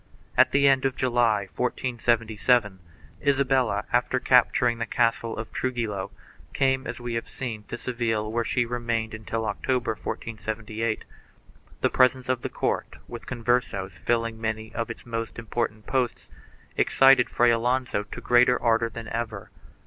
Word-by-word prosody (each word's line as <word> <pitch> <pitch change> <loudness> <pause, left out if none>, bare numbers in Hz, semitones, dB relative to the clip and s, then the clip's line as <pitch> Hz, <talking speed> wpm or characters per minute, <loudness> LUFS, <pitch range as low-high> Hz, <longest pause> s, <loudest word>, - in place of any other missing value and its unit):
At - - +6
the 140 0 +4
end 135 -1 +4
of 135 -1 0
July, 120 -4 +2
1477, 115 -1 0 0.4
Isabella, 135 -7 +2
after 125 +1 +2
capturing 125 -2 +3
the 115 - -2
castle 115 -2 0
of 110 0 -6
Tru 130 - -1
gillo, 110 -6 -3 0.4
came, 130 -1 +1
as - - -5
we 120 -1 -4
have 115 - -3
seen, 115 -5 -5
to 120 - -6
Seville 115 -4 -2
where 115 +1 0
she 125 +1 0
remained 115 -2 -2
until 110 +1 -4
October, 120 +3 -1
1478. 110 0 -4
1 - - -27
The - - +3
presence 130 0 +3
of 130 -2 +1
the - - -3
court, - - -2
with - - -9
Conversos 120 -6 -1
rilling 115 -1 0
many 110 0 -3
of 115 +1 -3
its 115 - -8
most 115 -1 -4
important 115 -2 -3
posts, 125 -3 -1 0.5
excited 135 -2 +5
Fray 120 0 +4
Alonso 120 -1 0
to 105 - -9
greater 125 0 +4
ardor 115 0 +2
than 115 0 -8
ever. 115 -4 -4
115 Hz, 150 wpm, -26 LUFS, 110-125 Hz, 0.5 s, At